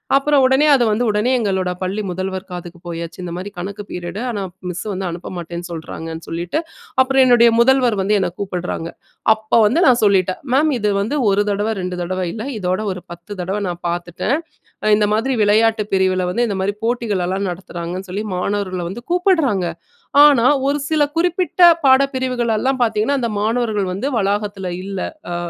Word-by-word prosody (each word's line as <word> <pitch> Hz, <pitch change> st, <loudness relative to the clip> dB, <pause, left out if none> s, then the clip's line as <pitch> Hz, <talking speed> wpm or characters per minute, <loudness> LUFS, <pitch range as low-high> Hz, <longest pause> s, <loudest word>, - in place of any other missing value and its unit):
அப்புறம் 280 Hz, 0 st, +3 dB
உடனே 265 Hz, +3 st, +4 dB
அது 265 Hz, -3 st, +4 dB
வந்து 215 Hz, +3 st, +1 dB
உடனே 210 Hz, +5 st, +1 dB
எங்களோட 190 Hz, -4 st, 0 dB
பள்ளி 190 Hz, +3 st, -2 dB
முதல்வர் 190 Hz, +1 st, -4 dB
காதுக்கு 175 Hz, -1 st, -8 dB
போயாச்சு. 170 Hz, -1 st, -6 dB
இந்த 175 Hz, -, -5 dB
மாதிரி 185 Hz, +3 st, -5 dB
கணக்கு 200 Hz, +3 st, -5 dB
பீரியட்டு 180 Hz, +5 st, -5 dB
ஆனா 210 Hz, -4 st, -3 dB, 0.3 s
மிஸ் 180 Hz, 0 st, -4 dB
வந்து 190 Hz, -1 st, -3 dB
அனுப்ப 170 Hz, +1 st, -7 dB
மாட்டேன்னு 170 Hz, 0 st, -6 dB
சொல்றாங்கன்னு 165 Hz, 0 st, -7 dB
சொல்லிட்டு. 170 Hz, -, -3 dB, 0.4 s
அப்புறம் 270 Hz, +1 st, +3 dB
என்னுடைய 240 Hz, -2 st, +6 dB
முதல்வர் 250 Hz, -2 st, +4 dB
வந்து 200 Hz, +2 st, +1 dB
என்ன 190 Hz, -, 0 dB
கூப்டுறாங்க. 180 Hz, -4 st, -4 dB, 0.4 s
அப்ப 220 Hz, +1 st, +1 dB
வந்து 245 Hz, +10 st, +2 dB
நான் 245 Hz, -2 st, +5 dB
சொல்லிட்டேன். 190 Hz, -2 st, +2 dB
மேம் 300 Hz, +3 st, +3 dB
இது 210 Hz, -1 st, +1 dB
வந்து 230 Hz, +9 st, -1 dB
1 200 Hz, +1 st, +2 dB
தடவ 205 Hz, +2 st, 0 dB
2 180 Hz, 0 st, -4 dB
தடவ 185 Hz, +1 st, -2 dB
இல்ல, 220 Hz, +1 st, -5 dB
இதோட 185 Hz, 0 st, -1 dB
ஒரு 180 Hz, -, -10 dB
10 175 Hz, +4 st, -15 dB
தடவ 190 Hz, +4 st, -2 dB
நான் 175 Hz, 0 st, -6 dB
பாத்துட்டேன். 175 Hz, +8 st, -2 dB, 0.5 s
அ -, -, +2 dB
இந்த 210 Hz, -1 st, +2 dB
மாதிரி 255 Hz, +4 st, 0 dB
விளையாட்டுப் 215 Hz, 0 st, +2 dB
பிரிவுல 185 Hz, -1 st, +2 dB
வந்து 240 Hz, +5 st, +1 dB
இந்த 200 Hz, -, -2 dB
மாரி 200 Hz, +2 st, -1 dB
போட்டிகளலாம் 200 Hz, -5 st, -1 dB
நடத்துறாங்கன்னு 175 Hz, +1 st, -6 dB
சொல்லி 205 Hz, +4 st, -3 dB
மாணவர்கள 185 Hz, -1 st, -2 dB
வந்து 235 Hz, +6 st, -7 dB
கூப்டுறாங்க. 325 Hz, -, +2 dB, 0.6 s
ஆனா 275 Hz, -5 st, +5 dB, 0.2 s
ஒரு 290 Hz, -, +1 dB
சில 310 Hz, -1 st, +1 dB, 0.2 s
குறிப்பிட்ட 355 Hz, +1 st, 0 dB, 0.2 s
பாடப் 275 Hz, +1 st, +5 dB
பிரிவுகள் 250 Hz, -3 st, 0 dB
எல்லாம் 260 Hz, -1 st, 0 dB
பாத்தீங்கன்னா, 225 Hz, +4 st, +1 dB
அந்த 235 Hz, -, 0 dB
மாணவர்கள் 220 Hz, -3 st, 0 dB
வந்து 205 Hz, +9 st, -3 dB
வளாகத்துல 200 Hz, -1 st, -1 dB
இல்ல, 195 Hz, -1 st, -5 dB, 0.3 s
அ -, -, -2 dB
205 Hz, 170 wpm, -19 LUFS, 185-240 Hz, 0.6 s, என்னுடைய